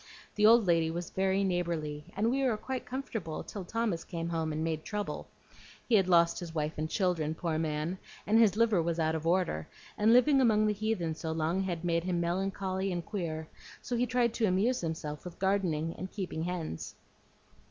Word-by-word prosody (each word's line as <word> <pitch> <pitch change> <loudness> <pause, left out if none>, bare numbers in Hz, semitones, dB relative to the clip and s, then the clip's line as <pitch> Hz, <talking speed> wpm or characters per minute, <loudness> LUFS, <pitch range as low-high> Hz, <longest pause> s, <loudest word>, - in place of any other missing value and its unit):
The 210 0 +4
old 230 -1 +7
lady 165 -2 +3
was 170 +1 -4
very 190 +1 +1
neighborly, 170 -5 -2
and 220 +3 +2
we 270 +1 +1
were 245 -5 +2
quite 260 +3 -5
comfortable 225 - -4
till 200 - -7
Thomas 215 -4 -1
came 170 -2 -4
home 160 -2 -1
and 155 +1 -2
made 160 -1 -2
trouble. 210 -1 -4 0.6
He'd 205 -6 +4
lost 170 -2 +4
his 170 -2 -7
wife 155 0 -1
and 155 +1 -2
children, 165 -5 0
poor 160 -2 -1
man, 160 +3 -2 0.3
and 220 +2 +4
his 215 -3 +5
liver 220 -6 +4
was 170 0 -1
out 160 -1 +1
of 160 0 -2
order, 170 - +1 0.3
and 215 +2 +5
living 265 +3 +6
among 215 -4 +4
the 210 - +2
heathen 205 -6 -1
so 160 0 -4
long 160 +4 0
had 175 -3 -3
made 170 -1 +1
him 180 -1 0
melancholy 190 +2 -1
and 175 -2 -3
queer; 160 -6 -4 0.4
so 245 - -2
he 245 +1 +1
tried 240 -2 +2
to 225 -2 +1
amuse 205 +7 +2
himself 160 -3 -4
with 180 -2 -9
gardening 180 -5 0
and 185 +1 -6
keeping 180 -5 -4
hens." 170 - -4
180 Hz, 195 wpm, -31 LUFS, 160-210 Hz, 0.6 s, old